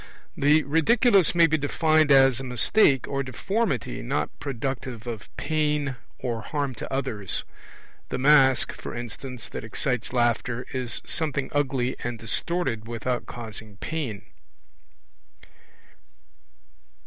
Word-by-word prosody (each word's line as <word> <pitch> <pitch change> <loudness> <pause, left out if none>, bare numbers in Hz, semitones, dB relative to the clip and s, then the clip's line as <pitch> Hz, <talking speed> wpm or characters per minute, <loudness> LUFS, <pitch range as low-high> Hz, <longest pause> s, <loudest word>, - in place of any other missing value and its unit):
The 150 +2 +4
Ridiculous 190 - +4
may 170 -1 +7
be 155 -1 +1
defined 155 +1 +2
as 135 -2 +6
a - - -5
mistake 130 - +3
or 140 -1 -1
deformity 140 - -2
not 75 +5 -2
productive 130 -3 -4
of 115 -4 -6
pain 150 -3 0 0.2
or 120 -3 -3
harm 140 +2 -2
to - - -6
others; 125 -8 -2 0.7
the - - -2
mask, 135 -1 +5
for - - -7
instance, 120 +1 -6
that - - -6
excites 125 +2 -1
laughter, 120 0 0
is 125 -3 -1
something 140 -4 0
ugly 135 -3 0
and 120 -1 -3
distorted 115 - -2
without 120 +2 -3
causing 110 -3 -7
pain. 135 -8 -4
130 Hz, 115 wpm, -25 LUFS, 120-150 Hz, 0.7 s, may